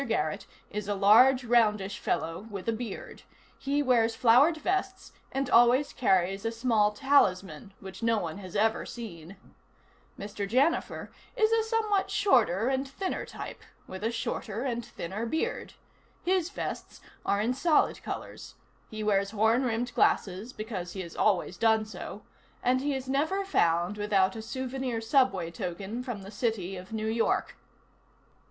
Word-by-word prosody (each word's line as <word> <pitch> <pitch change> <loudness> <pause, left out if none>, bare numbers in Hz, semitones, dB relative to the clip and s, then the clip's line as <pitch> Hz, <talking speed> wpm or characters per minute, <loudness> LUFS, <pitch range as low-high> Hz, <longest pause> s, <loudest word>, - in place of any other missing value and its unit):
Garrett 155 -8 -1 0.2
is 210 -1 -4
a 205 - 0
large, 250 +7 +6
roundish 210 -4 +2
fellow 165 +7 -2
with 200 -2 -7
a - - +3
beard. 220 -3 -7 0.4
He 285 +1 0
wears 230 -4 +3
flowered 255 +8 +5
vests 380 +3 -2 0.2
and 270 0 -1
always 245 +3 +4
carries 195 -4 +1
a 225 - -1
small 225 -3 +2
talisman 195 - +1
which 190 -1 -10
no 230 -1 +2
one 175 -2 -4
has 185 -1 -10
ever 220 +2 +2
seen. 190 -6 -9 0.8
Mr. 200 0 -5
Janifer 270 +9 +1 0.3
is 435 0 +3
a 455 -1 +3
somewhat 435 -3 0
shorter 225 - +3
and 270 +1 0
thinner 370 +8 -4
type, - - -8 0.2
with 190 +2 -8
a 225 - +1
shorter 225 -1 -3
and 240 -3 -2
thinner 205 +4 -5
beard. 320 - -2 0.5
His 365 -1 +1
vests 405 - -6 0.2
are 200 - +1
in 225 +4 +1
solid 305 +4 +2
colors, - - -7 0.3
he 215 0 -5
wears 200 -2 +2
horn 220 +4 +2
rimmed 245 +1 -1
glasses 195 +5 +1
because 205 -7 -6
he 190 - -4
has 170 -2 -9
always 190 -3 +1
done 220 -1 +3
so, 205 0 -8 0.4
and 255 +1 +2
he 285 0 -1
is 265 -1 -5
never 315 +9 0
found 175 - +1
without 195 -2 +2
a 220 - -5
souvenir 260 0 -3
subway 225 - +2
token 195 +5 -5
from 240 -6 -6
the 195 - -10
City 205 -4 -2
of 185 +2 -10
New 220 -1 -3
York. 225 +1 0
225 Hz, 155 wpm, -29 LUFS, 195-260 Hz, 0.8 s, large